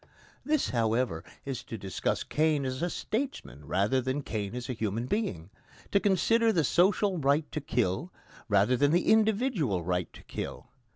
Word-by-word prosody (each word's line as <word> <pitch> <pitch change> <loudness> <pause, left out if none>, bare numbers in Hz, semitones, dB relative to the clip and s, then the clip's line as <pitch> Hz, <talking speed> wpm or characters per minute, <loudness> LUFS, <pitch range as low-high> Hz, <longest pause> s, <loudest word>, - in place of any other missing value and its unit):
This, 300 +2 +1
however, 115 -7 0 0.2
is 135 -3 -3
to 115 - -6
discuss 95 -2 -2
Cain 155 -2 +1
as 130 0 -3
a 175 - 0
statesman 220 - -4
rather 105 +8 +2
than 130 +3 -2
Cain 105 -2 -4
as 125 0 -5
a 125 - -2
human 110 0 -2
being 105 - -2 0.4
to 200 - +4
consider 225 +4 +3
the 165 -7 +2
social 185 +4 +3
right 145 +2 +2
to 155 - -3
kill 125 - -1 0.4
rather 105 +5 +4
than 145 +3 +3
the 175 +4 +2
individual 215 - +2
right 90 0 -1
to - - -13
kill. - - -6
135 Hz, 165 wpm, -29 LUFS, -, 0.4 s, to